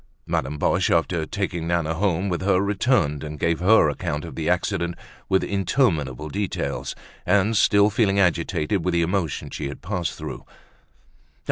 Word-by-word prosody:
Madame 70 +3 -2
Boche, - - +1
after 85 -1 +1
taking 90 -6 -3
Nana 85 -2 0
home 95 +1 0
with 90 -2 -2
her, 95 -1 +3
returned, 100 - +1
and 75 0 -6
gave 85 +3 0
her 95 -1 +5
account 75 0 -3
of - - -8
the - - -2
accident, 85 0 0 0.3
with 95 0 +3
interminable 80 - 0
details, 100 +5 -3 0.3
and 100 +4 +2
still 100 0 +4
feeling 100 -2 +2
agitated 90 -1 +1
with 90 0 0
the 85 - +3
emotion 85 -3 -2
she - - -4
had 70 - -8
passed 90 -2 -3
through. - - -7
90 Hz, 155 wpm, -23 LUFS, 80-100 Hz, 0.3 s, her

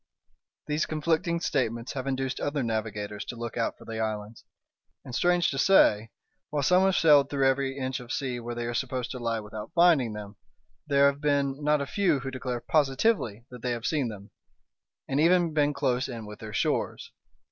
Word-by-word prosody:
These 150 +1 -1
conflicting 165 +2 0
statements 120 -5 -1
have 135 -1 -4
induced 130 -1 -2
other 145 -2 -1
navigators 105 -2 -3
to - - -6
look 115 -1 -6
out 115 - -1
for - - -15
the 110 -1 -5
islands; 110 0 -4 0.6
and, 125 - -9
strange 175 +5 +2
to 135 - -3
say, 115 - +4 0.4
while 145 -1 -1
some 180 +6 +4
have 190 -1 +2
sailed 145 -3 +5
through 135 -2 +2
every 135 0 0
inch 130 0 -2
of 125 0 -9
sea 130 -3 -2
where 120 0 -6
they 120 0 -3
are 120 - -3
supposed 125 0 -2
to 125 - -5
lie 115 -1 -1
without 105 +5 -8
finding 165 -10 +4
them, 105 -1 -8 0.5
there 140 -1 +4
have 140 0 +2
been 140 -1 0
not 150 0 +2
a - - -1
few 170 -5 +1
who 135 0 -5
declare 125 -2 -4
positively 135 - +1
that 125 -2 -10
they 125 -1 -1
have 115 0 -5
seen 145 -5 0
them; 105 -2 -9 0.8
and 135 +1 0
even 170 0 +3
been 150 -1 +2
close 135 -3 0
in 115 -3 -6
with 105 0 -10
their 110 -1 -8
shores. - - -1
135 Hz, 195 wpm, -27 LUFS, 115-150 Hz, 0.8 s, sailed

